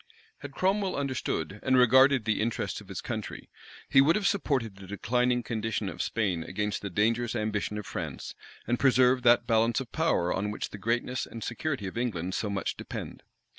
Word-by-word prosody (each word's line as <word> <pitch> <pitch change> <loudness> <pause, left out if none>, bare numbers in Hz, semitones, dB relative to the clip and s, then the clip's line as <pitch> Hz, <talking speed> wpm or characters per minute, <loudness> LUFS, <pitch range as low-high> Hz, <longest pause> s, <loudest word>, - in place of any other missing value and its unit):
Had 145 -1 -9
Cromwell 195 +2 +1
understood 130 - -2
and 130 0 +3
regarded 130 0 +5
the 110 -1 +1
interests 115 +1 -2
of - - -15
his - - -6
country, - - -6 0.4
he 135 - +6
would 155 +5 +4
have 210 - -1
supported 140 - 0
the 95 -1 -11
declining 125 +5 0
condition 110 -2 -2
of 85 - -5
Spain 95 -7 -1
against 105 +4 -3
the 100 - -4
dangerous 115 +5 +1
ambition 105 -1 -2
of 105 - -5
France, - - -5 0.3
and 120 +1 0
preserved 130 -1 +4
that 120 0 +5
balance 115 +2 +2
of 130 -3 -7
power 160 - +1
on 105 +2 -1
which 105 - -4
the 105 - -8
greatness 120 +4 -1
and 115 - -8
security 130 -2 -3
of 95 +5 -4
England 95 -7 -2
so 105 - -2
much 100 -1 -2
depend. - - -7
115 Hz, 185 wpm, -28 LUFS, 105-130 Hz, 0.4 s, he